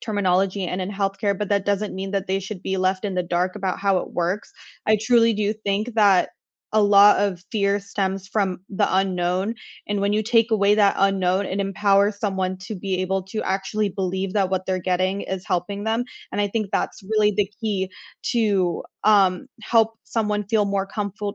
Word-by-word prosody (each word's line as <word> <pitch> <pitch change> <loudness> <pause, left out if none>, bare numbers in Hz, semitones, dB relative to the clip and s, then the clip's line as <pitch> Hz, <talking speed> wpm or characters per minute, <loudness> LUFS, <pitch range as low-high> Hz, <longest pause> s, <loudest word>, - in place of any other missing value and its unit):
terminology 195 -3 0
and 180 +2 -3
in 185 +2 -3
healthcare, 200 0 -1
but 210 -1 -3
that 200 -1 +1
doesn't 205 +1 -1
mean 190 +1 -4
that 195 -1 -1
they 190 +1 0
should 195 -1 -7
be 190 0 -2
left 185 +2 0
in 195 -2 -2
the 180 - 0
dark 180 +2 -1
about 190 -3 -2
how 195 -2 +2
it - - -6
works, 180 +4 -2 0.4
I 215 0 +5
truly 230 +1 +3
do 210 0 0
think 215 +2 -2
that 200 -4 +4 0.4
a 215 - +4
lot 205 0 +7
of 190 -4 -1
fear 200 -2 +1
stems 195 -1 -3
from 190 -4 -1
the 195 - +1
unknown, 190 +3 0 0.3
and 205 -1 -1
when 200 +1 +1
you 215 +1 +1
take 230 0 +2
away 200 -1 +4
that 200 -2 +4
unknown, 195 0 +2
it 190 - -3
empowers 200 +1 +2
someone 190 -2 -1
to 195 +2 -7
be 185 0 -2
able 190 +1 -1
to 205 +3 -4
actually 200 +2 -1
believe 190 0 -3
that 195 -3 +1
what 185 -1 -1
they're 185 -1 0
getting 185 +2 0
is 190 -1 -5
helping 200 +3 -2
them, 225 +2 0 0.3
and - - -1
I 205 - +1
think 215 0 -2
that's - - -2
really 210 +1 +2
the 205 -1 +1
key 200 -4 -1 0.4
to, 200 -7 +1 0.2
um, 195 -4 +4
help 225 0 +2
someone 210 -2 -1
feel 215 0 +2
more 200 -1 -1
comfolt 205 0 -4
200 Hz, 195 wpm, -23 LUFS, 190-210 Hz, 0.4 s, lot